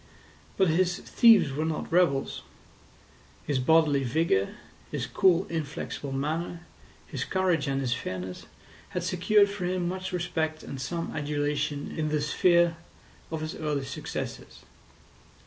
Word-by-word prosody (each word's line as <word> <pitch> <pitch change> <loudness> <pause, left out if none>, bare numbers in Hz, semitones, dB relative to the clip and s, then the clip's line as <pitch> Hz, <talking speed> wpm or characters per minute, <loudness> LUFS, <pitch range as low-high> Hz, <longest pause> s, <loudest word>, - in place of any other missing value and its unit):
But 190 -3 +4
his 180 +2 +2
thieves 225 - +5
were 150 +3 -1
not 160 0 -3
rebels. 165 -6 +2 1.0
His 140 -3 0
bodily 150 0 +4
vigour, 130 - +1 0.3
his - - -3
cool 185 -1 +3
inflexible 150 -3 -4
manner, 160 +5 -2 0.4
his - - -4
courage 185 -6 +1
and 135 0 0
his 125 -3 0
fairness, 95 -6 -5 0.5
had 180 - -1
secured 190 +3 +4
for 200 -2 -4
him 180 -1 -1
much 185 +1 -4
respect 160 -3 -2
and 135 - -6
some 165 +5 -3
adulation 145 -1 -2
in 155 -1 -1
the 150 0 +1
sphere 170 +2 +3 0.5
of 160 -1 -4
his 155 0 -4
early 150 -3 -2
successes. - - -6
160 Hz, 130 wpm, -28 LUFS, 145-180 Hz, 1.0 s, thieves